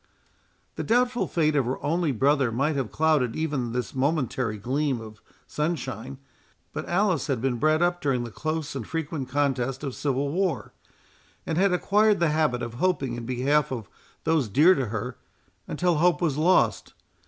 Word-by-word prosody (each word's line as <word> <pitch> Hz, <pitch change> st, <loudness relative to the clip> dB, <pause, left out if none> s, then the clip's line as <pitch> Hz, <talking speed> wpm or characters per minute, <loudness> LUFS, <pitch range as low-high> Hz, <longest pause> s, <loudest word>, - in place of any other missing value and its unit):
The -, -, -2 dB
doubtful 245 Hz, +1 st, +2 dB
fate 155 Hz, -3 st, +1 dB
of 135 Hz, -4 st, +2 dB
her 130 Hz, +2 st, -2 dB
only 165 Hz, 0 st, +1 dB
brother 135 Hz, 0 st, +2 dB
might 140 Hz, +6 st, 0 dB
have 135 Hz, -6 st, -2 dB
clouded 150 Hz, -7 st, +2 dB
even 145 Hz, -7 st, -2 dB
this 125 Hz, -3 st, -3 dB
momentary 130 Hz, -5 st, 0 dB
gleam 130 Hz, +4 st, -1 dB
of 110 Hz, -1 st, -11 dB, 0.2 s
sunshine; 135 Hz, -5 st, -3 dB, 0.6 s
but -, -, -5 dB
Alice 185 Hz, -1 st, +1 dB
had 135 Hz, -5 st, 0 dB
been 125 Hz, 0 st, 0 dB
bred 155 Hz, +3 st, +3 dB
up 175 Hz, 0 st, +1 dB
during 130 Hz, -4 st, 0 dB
the 120 Hz, -, -7 dB
close 155 Hz, +3 st, -3 dB
and 125 Hz, -5 st, -5 dB
frequent 155 Hz, -4 st, -4 dB
contest 135 Hz, -1 st, 0 dB
of 135 Hz, -3 st, -3 dB
civil 140 Hz, 0 st, -1 dB
war, 170 Hz, -, -1 dB, 0.7 s
and 160 Hz, -, -2 dB
had 195 Hz, +3 st, +3 dB
acquired 205 Hz, +3 st, +3 dB
the 170 Hz, -2 st, +3 dB
habit 150 Hz, -6 st, +1 dB
of 115 Hz, -1 st, -5 dB
hoping 140 Hz, -3 st, 0 dB
in 120 Hz, -1 st, -6 dB
behalf 140 Hz, +4 st, +1 dB
of 115 Hz, -6 st, -4 dB, 0.4 s
those 155 Hz, -8 st, +1 dB
dear 155 Hz, -, +6 dB
to 135 Hz, -8 st, -1 dB
her, 115 Hz, +3 st, -4 dB, 0.5 s
until 180 Hz, -3 st, +1 dB
hope 170 Hz, -1 st, +3 dB
was 160 Hz, -6 st, 0 dB
lost. 170 Hz, +5 st, +2 dB
145 Hz, 170 wpm, -26 LUFS, 125-160 Hz, 0.7 s, dear